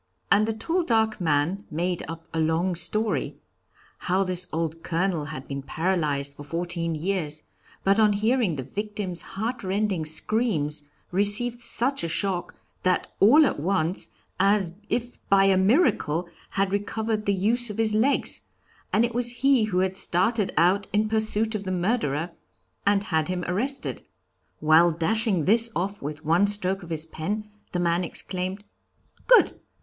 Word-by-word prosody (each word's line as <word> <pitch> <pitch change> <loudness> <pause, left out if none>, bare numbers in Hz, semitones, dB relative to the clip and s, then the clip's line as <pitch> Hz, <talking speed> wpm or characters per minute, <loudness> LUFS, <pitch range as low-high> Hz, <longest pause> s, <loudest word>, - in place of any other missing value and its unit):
And 210 +2 +4
the 225 - 0
tall, 330 +11 -1
dark 220 - +1
man 165 +5 0
made 175 +3 -2
up 165 0 -8
a 165 - -1
long 160 +3 +1
story. 180 -1 +1 0.6
How 185 +2 +1
this 180 -1 +1
old 165 0 -3
Colonel 170 -2 -1
had 140 -3 -8
been 140 0 -5
paralyzed 150 -3 -1
for 145 - -11
fourteen 170 +1 -3
years, 155 -3 -2 0.4
but 195 +3 +3
on 210 -1 +5
hearing 220 -3 +1
the 135 - -4
victim's 200 - -4
heartrending 200 -4 -2
screams, 155 -4 0 0.3
received 205 +6 +3
such 265 +2 0
a - - -1
shock 180 +1 -2 0.3
that 185 0 0
all 290 +10 +7
at 260 - -1
once, 175 +1 -1 0.3
as 195 -3 +2 0.2
if 245 0 -2
by 195 -1 +5
a 195 -1 +4
miracle, 190 - +2 0.2
had 195 0 -1
recovered 215 +1 -2
the 200 - +3
use 230 +5 +2
of 210 - -6
his 220 -1 +2
legs; 240 +7 +2 0.5
and 225 +3 +3
it 235 - -4
was 240 0 +2
he 270 -5 +4
who 185 -4 0
had 190 0 -1
started 205 +3 +1
out 185 +5 +3
in 215 +1 +1
pursuit 220 0 0
of 210 -2 -3
the 190 - -4
murderer 175 - -1 0.6
and 200 0 +3
had 160 -5 0
him 180 -1 -3
arrested. 250 +11 -2 0.6
"While 160 +3 +5
dashing 185 - 0
this 230 +3 +4
off 195 +4 -2
with 150 +2 -6
one 170 +6 +3
stroke 195 -1 +1
of 175 - -11
his 160 -1 0
pen, 210 +7 -5 0.2
the 180 - -2
man 175 0 +1
exclaimed: 185 +3 -3 0.6
'Good! - - +5
190 Hz, 155 wpm, -25 LUFS, 165-215 Hz, 0.6 s, all